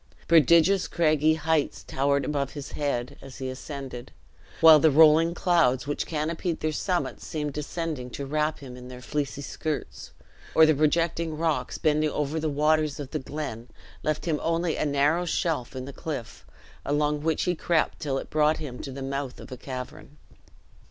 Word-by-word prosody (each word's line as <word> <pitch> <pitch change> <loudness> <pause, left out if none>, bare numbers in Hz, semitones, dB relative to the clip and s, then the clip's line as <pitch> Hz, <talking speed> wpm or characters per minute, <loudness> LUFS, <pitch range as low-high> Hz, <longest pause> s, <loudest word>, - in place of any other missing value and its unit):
Prodigious 170 +4 +5
craggy 155 -2 +2
heights 160 -1 0
towered 140 0 0
above 140 -1 -2
his 145 -2 -7
head 135 -4 -3
as 135 -2 -11
he 130 -1 -4
ascended; 130 -2 -7 0.5
while 160 -1 +9
the 160 - +5
rolling 160 +3 +5
clouds 165 -9 +2
which 145 0 -3
canopied 165 +2 -2
their 155 - -1
summits 175 +3 -2
seemed 150 -3 -4
descending 150 -3 -4
to 140 +3 -6
wrap 150 +2 0
him 130 -3 -9
in 125 0 -10
their 125 0 -9
"fleecy 145 0 -3
skirts;" 155 +1 -5 0.5
or 160 - +8
the 155 - +4
projecting 160 +2 +1
rocks 155 -6 -1
bending 155 0 +2
over 150 +2 -2
the 155 0 -1
waters 150 +1 +1
of 140 -2 -6
the 155 - -2
glen, 130 -5 -6 0.3
left 155 0 -2
him 155 -4 0
only 165 0 0
a - - -1
narrow 145 +4 +2
shelf 160 -7 -1
in 130 0 -5
the 140 - -8
cliff, 140 -7 -6 0.4
along 150 +1 0
which 160 +1 0
he 180 - +1
crept 165 -1 0
till 135 -3 -2
it - - -6
brought 155 0 +3
him 135 -5 -7
to 135 - -6
the 135 +1 -6
mouth 135 -1 -4
of - - -11
a - - -4
cavern. 130 +3 -8
150 Hz, 175 wpm, -26 LUFS, 140-160 Hz, 0.5 s, while